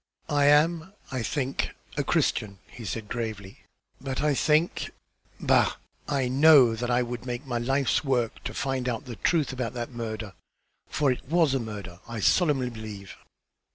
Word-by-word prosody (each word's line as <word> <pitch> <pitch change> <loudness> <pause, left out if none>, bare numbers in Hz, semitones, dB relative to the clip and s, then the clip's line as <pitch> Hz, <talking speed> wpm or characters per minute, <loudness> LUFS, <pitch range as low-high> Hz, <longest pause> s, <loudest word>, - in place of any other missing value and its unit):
"I 145 -2 +3
am, 160 +5 +3 0.2
I 130 -2 -2
think, 135 +2 -2 0.2
a - - 0
Christian," 100 -2 0
he 115 - -10
said, 105 +3 -4
gravely, 110 -4 -5 0.4
"but 135 -1 -3
I 150 0 +2
think 155 +4 +2 0.5
bah! - - +3 0.3
I 135 -3 0
know 135 -2 +7
that 120 +2 -3
I 125 0 +3
would 120 -1 -5
make 120 +3 -4
my 120 -3 -2
life's 135 +5 +1
work 125 -5 -1
to - - -4
find 130 -2 -1
out 115 -2 -3
the 120 -4 -7
truth 155 -6 +1
about 125 -3 -3
that 120 0 -4
murder, 110 -3 -5 0.6
for 145 -3 +2
that 125 - -2
it 140 - -21
was 165 -4 +3
a 135 - +1
murder, 105 -6 -7
I 115 -1 -5
solemnly 125 - +2
believe." 105 -4 -8
125 Hz, 170 wpm, -27 LUFS, 115-140 Hz, 0.6 s, know